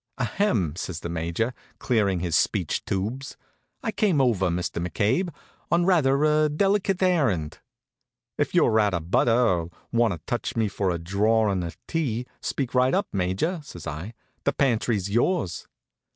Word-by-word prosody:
"Ahem," 115 - 0
says 90 -4 -5
the 85 - -5
Major, 85 +8 -2 0.2
clearin' 100 -7 +1
his 85 -3 0
speech - - +1
tubes, 115 +8 -3 0.5
"I 225 - -1
came 195 -9 +2
over, 110 -8 +2
Mr. 85 0 -2
McCabe, 110 - 0 0.4
on 170 0 +3
rather 150 -6 +3
a 155 0 +3
delicate 195 +3 +1
errand." 115 - +1 0.8
"If - - -1
you're 110 - +4
out 105 -3 +2
of 85 +1 -5
butter, 115 +2 +4
or 90 -9 +2 0.2
want 115 -4 +3
to - - -5
touch - - -3
me 110 -2 +2
for 100 -1 -1
a 85 - 0
drawin' 100 +3 +1
of 85 -1 -6
tea, 125 -7 -1 0.2
speak 135 -4 -3
right 130 +4 +3
up, 200 +1 0
Major," 100 - -1
says 90 - -10
I. 80 +9 -6 0.3
"The 140 - +1
pantry's 115 -7 +1
yours." 120 - 0
115 Hz, 155 wpm, -25 LUFS, 90-145 Hz, 0.8 s, you're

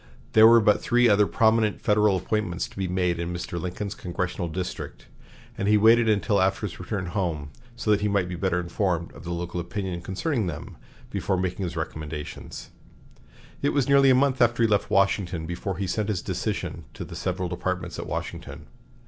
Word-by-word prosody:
There 110 0 +8
were 115 +1 +8
but 105 -1 +3
three 120 0 +3
other 105 -2 +4
prominent 110 -1 +2
Federal 105 -2 +3
appointments 95 -2 -2
to - - -18
be 95 -1 -2
made 90 -1 0
in 85 +1 -3
Mr. 85 -1 -4
Lincoln's 95 +3 -4
congressional 90 0 -3
district, 90 +2 -5 0.5
and 100 - -2
he 105 0 +5
waited 115 +2 +5
until 105 -1 +2
after 95 0 +1
his 85 -4 -7
return 95 +1 -3
home 85 -6 -3 0.2
so 110 - -1
that 105 - +3
he 105 - +1
might 100 -3 +1
be 90 - -5
better 90 0 0
informed 85 -1 -1
of - - -12
the 85 - -4
local 85 +1 -3
opinion 90 0 -4
concerning 105 - -1
them 85 - -6 0.4
before 95 - -1
making 95 +1 -2
his 85 - -5
recommendations. 75 -1 -6 0.9
It 140 - +1
was 140 -3 +1
nearly 140 -1 +6
a 130 - +6
month 130 0 +2
after 120 0 +3
he - - +5
left 105 -2 +1
Washington 95 -4 +1
before 85 +2 -4
he 100 - -2
sent 105 +3 -1
his 95 -5 -1
decision - - -3
to - - -6
the - - -9
several 90 - -2
departments 90 0 -3
at - - -5
Washington. - - -6
95 Hz, 190 wpm, -25 LUFS, 90-105 Hz, 0.9 s, There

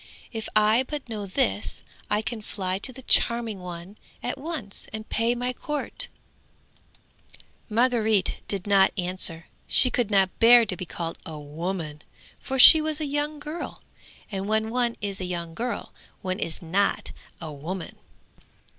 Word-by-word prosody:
If 225 -2 -5
I 215 +3 +5
but 295 -4 -5
know 210 -3 -5
this, 100 - 0 0.3
I 210 +1 +1
can 225 0 -4
fly 190 -2 -3
to 255 - -4
the 260 +1 -12
charming 235 -4 +2
one 180 +2 -9 0.2
at 245 - -2
once, 280 -10 -6
and 220 0 -7
pay 230 +2 +2
my 250 +1 -2
court!" 295 +3 -1 1.6
Margaret 220 -3 +2
did 195 -3 -1
not 195 -2 +5
answer. 180 -2 +1 0.2
She 255 - +6
could 240 -3 0
not 195 -2 +2
bear 235 0 +8
to 195 - -3
be 180 - -6
called 165 -1 -5
a 160 -1 -8
woman, 155 +1 -5 0.4
for 265 - -4
she 310 +4 +10
was 310 0 -2
a 310 - -1
young 295 +1 -2
girl, 300 +3 -7 0.5
and 195 0 -3
when 220 +1 0
one 240 -1 +1
is 200 -2 -4
a - - -2
young 170 -2 -4
girl, 235 +7 -4 0.3
one 185 +1 -2
is 165 -4 -4
not 195 +5 0 0.3
a 160 -2 -6
woman. 165 +6 -6
210 Hz, 155 wpm, -25 LUFS, 185-245 Hz, 1.6 s, she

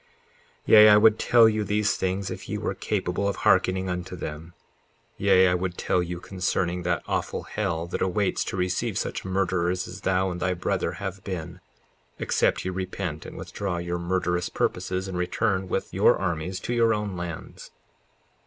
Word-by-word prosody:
54:7 - - -35 0.6
Yea, 105 0 +8
I 105 - +8
would 110 +1 +5
tell 120 -2 +6
you 110 -1 +1
these 105 +1 +1
things 95 +1 -2
if - - -7
ye - - -2
were - - -2
capable 90 +3 -2
of 100 - -1
hearkening 95 0 +2
unto 90 0 -4
them; 85 0 -7 0.6
yea, 95 -1 +4
I 90 - +3
would 90 0 -2
tell 90 - +1
you 90 0 -4
concerning 90 -1 -1
that 85 -2 -1
awful - - -2
hell 85 -6 -2
that 85 - -4
awaits 95 +1 +1
to - - -4
receive 90 0 -1
such - - -3
murderers 90 -1 0
as - - -9
thou 95 0 +1
and 90 - -5
thy 90 0 0
brother 85 - -1
have 95 -1 -6
been, 85 -2 -6 0.6
except - - +1
ye 95 - -1
repent 95 -3 -4
and - - -10
withdraw 95 -3 -4
your 85 0 -3
murderous 90 0 -1
purposes, 95 +1 -2
and 90 -2 -4
return 95 +1 0
with - - -3
your - - +4
armies 90 0 -2
to 120 - -3
your 115 -2 +3
own 105 -2 -3
lands. 85 -2 -7
95 Hz, 180 wpm, -26 LUFS, 90-100 Hz, 0.6 s, Yea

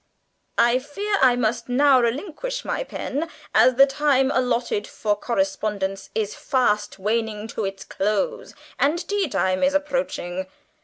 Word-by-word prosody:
"I 240 +2 +4
fear 400 +10 -3
I 255 -2 +6
must 235 0 -1
now 265 +1 +5
relinquish 380 - -3
my - - -1
pen, 330 - -4 0.2
as 255 - +5
the 270 +2 +8
time 270 -1 +2
allotted 240 -4 0
for 210 -1 -1
correspondence 195 -2 -2
is 215 -2 -1
fast 250 -10 0
waning 215 +1 -1
to 220 -2 -3
its 195 0 -5
close, 215 - -2 0.2
and 335 +5 +1
tea 405 -3 0
time 185 -3 0
is 275 +1 +2
approaching. 190 - -2
245 Hz, 140 wpm, -23 LUFS, 210-290 Hz, 0.2 s, the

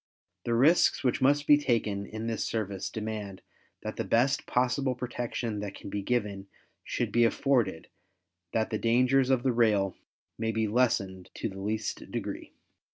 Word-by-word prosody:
The 120 - +1
risks 145 +8 +4
which 125 -1 +1
must 145 +2 +3
be 145 0 +6
taken 105 -7 0
in 110 +1 -6
this 115 -1 -1
service 100 -4 -3
demand 105 -4 -5 0.4
that - - -5
the - - -1
best 135 +6 +1
possible 130 +1 +1
protection 120 -3 -3
that 100 -1 -5
can - - -9
be 100 - -2
given 100 -3 -2 0.4
should - - -2
be 120 - +4
afforded 115 -7 +1 0.6
that 110 -1 0
the 110 - -1
dangers 125 +3 +3
of 130 -2 +2
the 130 - +2
rail 105 -5 +2 0.4
may 110 0 0
be 110 0 0
lessened 100 -5 0
to - - -3
the 95 0 -8
least 110 +1 -3
degree. - - -5
115 Hz, 160 wpm, -29 LUFS, 105-125 Hz, 0.6 s, be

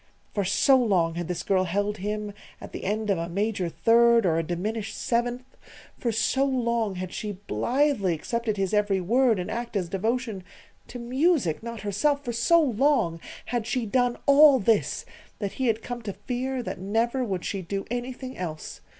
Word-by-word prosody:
For 200 - 0
so 230 +8 +4
long 185 -9 +2
had 170 0 -4
this 180 -1 -3
girl 185 -1 +2
held 205 +4 -1
him 210 +1 -4 0.3
at - - -10
the - - -7
end 210 +1 0
of 190 - +1
a 170 +1 -3
major 200 -1 -1
third 235 +3 +4
or 165 -2 +2
a - - -1
diminished 205 +6 -3
seventh; 245 +1 -1 0.5
for 235 - -2
so 225 +5 +1
long 235 -6 0
had 185 0 -5
she 210 -1 -4
blithely 205 - 0
accepted 225 +6 -2
his 195 0 -1
every 205 -2 +2
word 230 +5 +3
and 180 - -4
act 235 0 -4
as 185 -4 -1
devotion 220 +1 -2 0.4
to 245 - -8
music, 255 - +1
not 235 -1 -6
herself 280 +9 0
for 240 - -2
so 235 +9 +4
long 260 - +2 0.3
had 235 -2 -2
she 250 -3 -1
done 245 +2 +1
all 280 0 +7
this 220 -1 +1 0.3
that 200 -2 -3
he 260 - -1
had 225 -1 0
come 245 -1 -5
to 205 -3 -5
fear 250 +5 -3
that - - -5
never 230 +7 0
would 190 -6 -3
she 195 - -3
do 195 +3 -4
anything 255 +1 -5
else. 160 -4 -6
220 Hz, 185 wpm, -26 LUFS, 195-245 Hz, 0.5 s, all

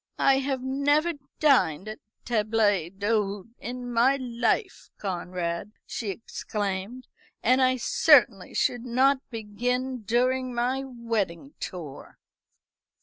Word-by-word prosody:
"I 270 0 +4
have 265 -1 -2
never 290 +5 +2 0.3
dined 215 - +3
at 215 0 -6
a 215 - -49
table 220 -2 -1 0.3
d'hôte 205 +1 -1
in 245 0 -6
my 245 +4 +4
life, 255 - -1
Conrad," 180 0 -3
she 220 - -4
exclaimed, 205 +2 -4 0.4
"and 255 +3 +4
I 255 0 +3
certainly 240 - +4
should 245 -1 +1
not 260 +3 +3
begin 245 +3 -2
during 250 +3 0
my 255 +3 0
wedding 235 - -3
tour." 165 -7 -8
240 Hz, 110 wpm, -27 LUFS, 205-260 Hz, 0.4 s, I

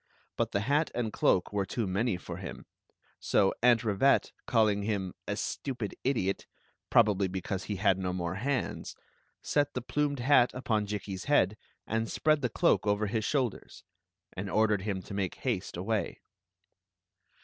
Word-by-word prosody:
But - - -1
the 100 - 0
hat 145 +7 +2
and 115 -3 -2
cloak 95 +2 +2
were 100 -1 +1
too 110 +4 -2
many 100 +2 0
for - - -7
him. - - -8 0.5
So 95 - +2
Aunt 120 -1 +5
Rivette, 110 +5 +3 0.2
calling 110 -3 +3
him 100 -3 -2
"a - - -1
stupid 125 -6 -3
idiot," 105 -8 0 0.2
— - - -42
probably 105 -4 +4
because 95 0 -4
he 105 - -3
had 95 -1 +2
no 90 -1 -1
more 90 -1 -2
hands, 130 +7 -2 0.3
— - - -41
set 145 -1 +1
the 125 - -1
plumed 145 +2 0
hat 125 -1 +5
upon 110 -5 0
Jikki's 100 -2 -5
head 110 -9 +3 0.3
and 115 0 -1
spread 155 -1 +2
the 125 - 0
ckw^ - - +3
over 105 +1 +2
his 110 +1 -1
shoulders* 130 -7 -2 0.5
and 95 +2 -5
ordered 105 -1 +2
him 95 -2 -3
to - - -9
make 95 -3 -2
haste 105 -9 -3
away. 105 +3 -1
105 Hz, 165 wpm, -30 LUFS, 95-125 Hz, 0.5 s, Aunt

